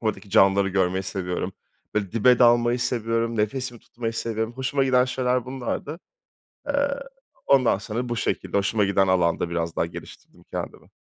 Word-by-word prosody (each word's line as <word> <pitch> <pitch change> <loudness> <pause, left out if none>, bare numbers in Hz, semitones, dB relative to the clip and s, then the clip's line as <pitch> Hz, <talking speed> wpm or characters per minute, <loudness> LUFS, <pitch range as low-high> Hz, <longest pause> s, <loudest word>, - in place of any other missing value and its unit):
Oradaki 110 -3 -3
canlıları 100 -1 +4
görmeyi 95 -1 +1
seviyorum. 90 -1 -3 0.4
Böyle 105 -2 -1
dibe 115 +2 +4
dalmayı 120 0 +4
seviyorum, 115 -1 -1
nefesimi 120 +2 -2
tutmayı 115 -1 -5
seviyorum. 110 0 -3
Hoşuma 135 +2 0
giden 125 -1 +4
şeyler 125 -1 0
bunlardı. 135 +5 -4 0.7
Eee, 285 - -1 0.7
ondan 130 -7 +4
sonra 115 +4 -4
bu 120 - -1
şekilde, 115 - -1
hoşuma 105 +2 +1
giden 95 0 +2
alanda 90 -2 +1
biraz 85 -1 -2
daha - - +1
geliştirdim 85 - -12
kendimi. - - -7
115 Hz, 145 wpm, -24 LUFS, 95-125 Hz, 0.7 s, canlıları